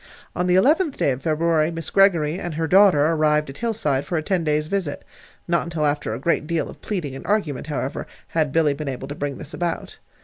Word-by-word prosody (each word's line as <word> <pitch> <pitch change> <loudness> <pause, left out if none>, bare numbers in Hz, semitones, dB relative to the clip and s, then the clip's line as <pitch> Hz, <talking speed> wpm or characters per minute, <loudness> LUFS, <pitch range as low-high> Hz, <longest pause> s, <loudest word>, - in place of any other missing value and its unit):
On 180 +1 0
the 180 - +3
eleventh 300 - +3
day - - +2
of 130 +1 -4
February 160 +1 +1
Mrs. 165 -2 -5
Greggory 175 -4 +3
and 175 -5 -5
her 165 +1 -1
daughter 185 -4 +5
arrived 150 -2 +2
at 135 - -13
Hillside 200 - 0
for 175 - -2
a 155 - -1
ten 185 -1 0
days' 150 -1 +1
visit. 175 -4 -3 0.4
Not 170 -1 +2
until 165 -2 -2
after 145 -5 -1
a - - -6
great 150 +1 0
deal 165 -1 -1
of - - -16
pleading 165 -10 -4
and - - -8
argument, 160 -11 -1
however, 145 -2 -3 0.2
had 155 -4 0
Billy 155 -1 +3
been 145 0 -5
able 130 0 -5
to - - -4
bring 145 -2 -4
this 150 -2 -7
about. 170 -2 -4
160 Hz, 225 wpm, -22 LUFS, 145-180 Hz, 0.4 s, daughter